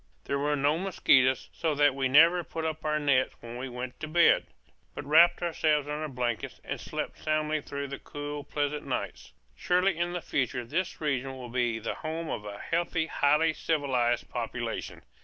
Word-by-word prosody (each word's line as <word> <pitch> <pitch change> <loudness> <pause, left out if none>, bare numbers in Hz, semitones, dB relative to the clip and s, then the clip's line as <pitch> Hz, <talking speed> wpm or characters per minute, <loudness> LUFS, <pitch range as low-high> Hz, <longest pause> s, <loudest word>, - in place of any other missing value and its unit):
There 140 - -2
were 145 +1 +1
no 145 +3 +1
mosquitoes, 130 -8 +3
so 160 -2 -1
that 145 -1 +4
we 135 -1 0
never 165 +6 +6
put 160 0 -5
up 160 0 -3
our 150 0 +1
nets 140 -4 +2
when 115 0 -9
we 130 +1 -5
went 125 0 -6
to 155 - -5
bed; 170 +2 +4 0.5
but - - -6
wrapped 170 +4 +5
ourselves 155 -3 +1
in 150 - -3
our 155 +1 -3
blankets 125 -4 -3
and - - -5
slept - - -5
soundly 155 0 0
through 140 0 -5
the 140 - -6
cool, 145 0 -6
pleasant 145 +1 -2
nights. - - -4 0.2
Surely 180 - +2
in 175 +1 -1
the 175 - -2
future 125 -2 -1
this 170 +9 -2
region 135 -3 -1
will 125 -2 -8
be 120 -2 0
the 115 0 -3
home 160 +1 -4
of 105 - -4
a 100 -1 -6
healthy 165 +2 -1
highly 155 +1 +2
civilized 130 -7 0
population. - - -4
145 Hz, 185 wpm, -29 LUFS, 130-160 Hz, 0.5 s, never